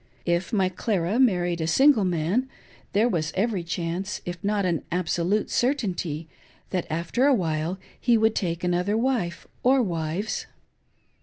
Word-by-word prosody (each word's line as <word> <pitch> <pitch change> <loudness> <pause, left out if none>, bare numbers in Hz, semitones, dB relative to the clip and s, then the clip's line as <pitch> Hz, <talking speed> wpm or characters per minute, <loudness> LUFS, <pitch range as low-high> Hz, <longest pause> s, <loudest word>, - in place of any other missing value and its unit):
If 175 +4 0
my 195 -5 +2
Clara 185 +2 -1
married 175 -8 +2
a 160 - -1
single 265 - +5
man, 180 +9 0 0.4
there 215 +4 +3
was 165 -8 -1
every 200 -2 0
chance, 170 +3 -3
if 175 -1 -6
not 205 -1 +1
an 170 -3 0
absolute 180 +3 0
certainty, 185 - -1 0.4
that 180 -3 -1
after 170 - +1
a 280 - +5
while 165 -2 -1 0.2
he 240 -2 +3
would 220 0 +3
take 170 -4 -2
another 180 +4 +1
wife, 225 -10 -1 0.2
or 260 +1 +4
wives. 170 +2 -2
185 Hz, 145 wpm, -25 LUFS, 170-220 Hz, 0.4 s, single